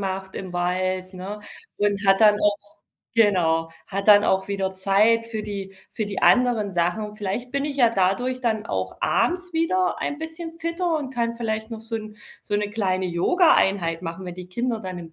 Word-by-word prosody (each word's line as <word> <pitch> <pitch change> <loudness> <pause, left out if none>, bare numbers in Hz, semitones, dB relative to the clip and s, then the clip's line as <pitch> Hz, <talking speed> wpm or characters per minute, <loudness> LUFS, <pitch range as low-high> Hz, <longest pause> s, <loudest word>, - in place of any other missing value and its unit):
macht 190 -1 -4
im 185 -2 -6
Wald, 185 +1 -1
ne, 190 +3 -6 0.4
und 205 0 0
hat 195 +1 +4
dann 210 -1 +7
auch 205 0 +3 0.6
genau, 170 -7 +3 0.2
hat 200 +1 -3
dann 205 0 +8
auch 190 +1 +1
wieder 195 -1 -1
Zeit 205 +5 +3
für 220 -2 -4
die 195 -2 -6 0.2
für 215 - -2
die 200 - -4
anderen 240 -6 +3
Sachen. 180 +5 -1
Vielleicht 215 +4 -4
bin 280 0 0
ich 290 -1 -3
ja 240 -4 +5
dadurch 235 +6 0
dann 220 -2 -1
auch - - -3
abends 360 +1 0
wieder 360 +3 +1
ein 290 - -3
bisschen 325 +1 -6
fitter 335 0 -1
und 265 -3 -6
kann 235 -1 -1
vielleicht 220 -1 -3
noch 225 -1 -6
so 225 0 -6
'n 215 -1 -6 0.3
so 205 - -1
'ne 205 0 -2
kleine 190 -3 0
Yoga-Einheit 180 - +2
machen, 170 +2 -6
wenn 180 -1 -6
die 180 0 -9
Kinder 235 +3 -2
dann 185 -2 -6
im 165 -2 -10
205 Hz, 190 wpm, -24 LUFS, 190-235 Hz, 0.6 s, dann